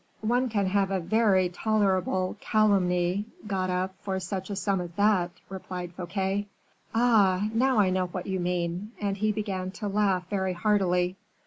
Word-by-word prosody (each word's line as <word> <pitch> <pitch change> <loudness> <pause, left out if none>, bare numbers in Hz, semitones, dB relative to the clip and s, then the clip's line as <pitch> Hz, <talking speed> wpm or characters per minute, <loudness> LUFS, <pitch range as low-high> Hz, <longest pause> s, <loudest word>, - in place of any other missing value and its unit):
one 245 +3 +2
can 205 -3 0
have 195 0 +1
a 195 -1 0
very 195 0 +3
tolerable 185 -1 0
calumny 190 -3 +2 0.2
got 190 -3 -1
up 185 +1 -1
for 190 -1 -2
such 190 +1 -4
a 200 - -3
sum 195 -1 0
as 175 - -5
that," 200 -2 +3 0.2
replied 180 -2 -6
Fouquet. 190 +3 -2 0.4
"Ah! 210 -5 +3
now 255 +2 +2
I 195 -3 +4
know 185 0 0
what 180 0 -5
you 190 -1 -2
mean," 180 +4 -2
and 200 -1 -1
he 215 +1 +1
began 195 -3 -3
to 210 - -5
laugh 195 -3 +1
very 190 -2 -1
heartily. 180 -1 +1
190 Hz, 160 wpm, -27 LUFS, 180-210 Hz, 0.4 s, I